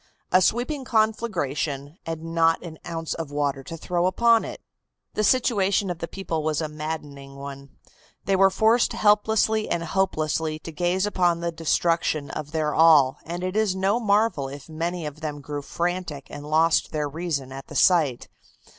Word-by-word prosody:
A 185 - +5
sweeping 250 +8 0
conflagration 175 - -1
and 165 0 -5
not 165 0 +3
an 160 -3 -9
ounce 165 -1 -3
of 165 -3 -5
water 145 -1 -1
to 165 - -7
throw 175 +2 0
upon 230 +4 +4
it! - - -7 0.5
The 215 - 0
situation 200 -5 +2
of 170 - -6
the 170 - -4
people 165 -3 -3
was 155 -1 0
a 160 - -1
maddening 150 -3 -6
one. 140 0 -8 0.6
They 195 - +2
were 195 0 +5
forced 220 +5 +3
helplessly 215 +1 +2
and 170 -1 -1
hopelessly 160 -3 -1
to 165 - -7
gaze 175 +4 0
upon 175 -4 +1
the 170 0 -1
destruction 165 -2 0
of 150 -1 -5
their 155 -1 -1
all, 155 -5 +5
and 175 +2 -5
it 185 +1 -3
is 215 -3 +2
no 195 +4 +1
marvel 210 - +2
if 140 +1 -10
many 165 +1 -3
of 150 +1 -7
them 150 -2 -4
grew 145 +1 -5
frantic 170 -2 -3
and 145 0 -8
lost 160 +1 +3
their 150 -1 -1
reason 145 -3 -3
at 135 0 -8
the - - -10
sight. 155 -9 +3
165 Hz, 170 wpm, -24 LUFS, 150-190 Hz, 0.6 s, A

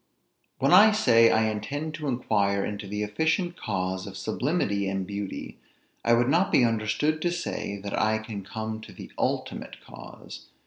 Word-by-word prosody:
When 135 +5 +2
I 215 +4 +8
say, 115 - +5
I 110 0 +3
intend 140 +9 -3
to 155 -1 -5
inquire 100 -6 +1
into 105 -1 -5
the 105 +2 -3
efficient 160 - 0
cause 95 - -3
of 100 0 -8
sublimity 105 - -1
and 95 -1 -2
beauty, 100 0 -6 0.4
I 115 - +3
would 120 +1 +2
not 175 +7 +2
be 125 - +5
understood 115 +8 0
to 175 - +1
say, 170 -11 -4
that 100 0 -6
I 110 0 +2
can 110 -2 -7
come 110 +2 -5
to - - -12
the - - -11
ultimate - - -2
cause. - - -11
110 Hz, 170 wpm, -26 LUFS, 100-150 Hz, 0.4 s, I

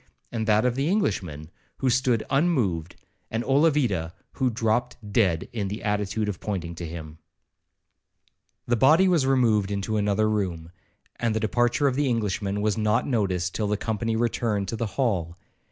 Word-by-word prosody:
and 110 -1 -2
that 110 +2 +3
of 125 - +2
the 135 +5 -1
Englishman, 90 - -1 0.3
who 135 - -1
stood 125 -3 +2
unmoved, 120 - +1 0.3
and 115 +1 -2
Olavida, 135 - +2 0.2
who 130 -2 0
dropped 115 0 0 0.2
dead 95 -7 +2
in 105 -4 -2
the 105 +3 -5
attitude 105 0 -1
of 100 -4 -3
pointing 90 -5 -4
to 85 0 -6
him 80 -1 -8 1.5
The 120 - +1
body 155 +10 +5
was 165 -7 +3
removed 115 -7 +3
into 100 +2 -2
another 105 +1 +2
room, 90 -6 -2 0.5
and 115 -2 0
the - - +1
departure 120 +5 +1
of 135 - +1
the 145 0 +1
Englishman 105 -3 -1
was 110 +1 0
not 110 +3 +2
noticed 95 -8 0
till 105 - -1
the 105 0 0
company 110 +1 -2
returned 110 -3 0
to - - -2
the 115 0 -2
hall. 90 - 0
110 Hz, 165 wpm, -25 LUFS, 95-120 Hz, 1.5 s, body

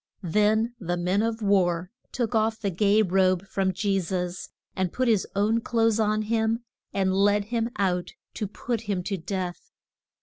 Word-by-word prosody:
Then 210 +6 +2
the 175 -2 -2
men 180 +4 +1
of 225 0 -2
war 180 -3 +2 0.2
took 245 -2 -2
off 220 0 +1
the 200 -2 -1
gay 205 +4 +3
robe 185 -1 +2
from 190 -1 0
Je 195 +1 0
sus, 180 0 -3 0.3
and 185 -2 -1
put 255 0 0
his 220 -5 +2
own 215 +3 +2
clothes 225 -1 +1
on 215 0 +1
him 225 +1 0 0.3
and 190 -1 +1
led 205 +1 +3
him 230 0 +1
out 180 -3 0 0.2
to 210 - -3
put 230 +3 -3
him 185 -3 0
to 195 +1 -2
death. 180 0 -5
200 Hz, 170 wpm, -26 LUFS, 185-220 Hz, 0.3 s, gay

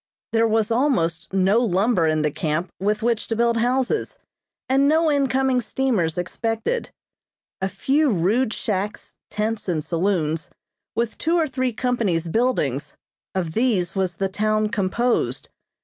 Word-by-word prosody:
There 230 0 +3
was 220 0 +1
almost 225 - +1
no 195 +3 +3
lumber 200 -4 +2
in 155 -1 +1
the 150 - +1
camp 155 +3 -2
with 210 +3 0
which 235 -2 0
to 225 - -1
build 235 0 +2
houses, 255 - 0 0.5
and 270 +2 +3
no 315 +1 +3
incoming 265 -2 +2
steamers 220 -11 0
expected. 225 - -2 0.7
A 190 - 0
few 275 - +1
rude 215 +5 +1
shacks, 205 -1 -3
tents 215 -1 -2
and 160 -3 0
saloons, 165 -3 0 0.5
with 230 -1 -2
two 330 +1 +1
or 330 -2 +2
three 260 -2 -1
companies' 215 -9 0
buildings 165 - 0 0.4
of 170 -4 -2
these 205 -6 +1
was 185 -3 0
the 195 +3 0
town 215 +2 0
composed. 210 +5 0
215 Hz, 140 wpm, -23 LUFS, 180-250 Hz, 0.7 s, There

